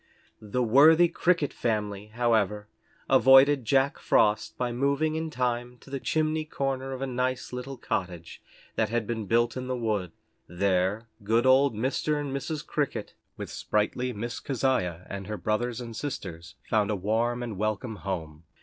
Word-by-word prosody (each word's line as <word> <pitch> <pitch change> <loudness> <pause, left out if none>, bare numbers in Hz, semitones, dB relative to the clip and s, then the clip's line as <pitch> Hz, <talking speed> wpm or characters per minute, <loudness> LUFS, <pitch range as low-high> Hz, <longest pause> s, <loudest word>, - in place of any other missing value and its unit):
The 110 +4 -1
worthy 155 +9 +6
Cricket 170 -3 +1
family, 105 -3 -2
however, 110 -3 0 0.4
avoided 135 0 +6
Jack 135 +5 +2
Frost 105 0 +2
by 125 -1 -1
moving 140 +5 +1
in 160 0 -2
time 125 -3 -2
to 135 - -17
the 135 - -3
chimney 155 +2 0
corner 135 -3 -3
of 130 +1 -4
a - - 0
nice 130 0 -2
little 130 +2 -5
cottage 90 -7 -4 0.4
that 110 - +1
had 115 -1 -1
been 110 -2 -4
built 120 +2 +2
in 130 0 -4
the 130 0 -2
wood. 105 -7 -1 0.4
There 95 +4 0 0.2
good 115 +4 +2
old 130 -1 +5
Mr. 135 +6 0
and 140 -2 -3
Mrs. 150 +2 -4
Cricket, 145 -2 -2 0.2
with - - -6
sprightly 115 +4 -1
Miss 120 +3 -5
Keziah 120 - -1
and 100 -1 -6
her 105 0 -4
brothers 115 +3 -1
and 115 -2 -7
sisters, 85 - -6
found 105 -2 +2
a 105 - +1
warm 115 +5 0
and 115 -4 -5
welcome 110 +2 -2
home. 80 -5 -5
120 Hz, 160 wpm, -27 LUFS, 105-135 Hz, 0.4 s, worthy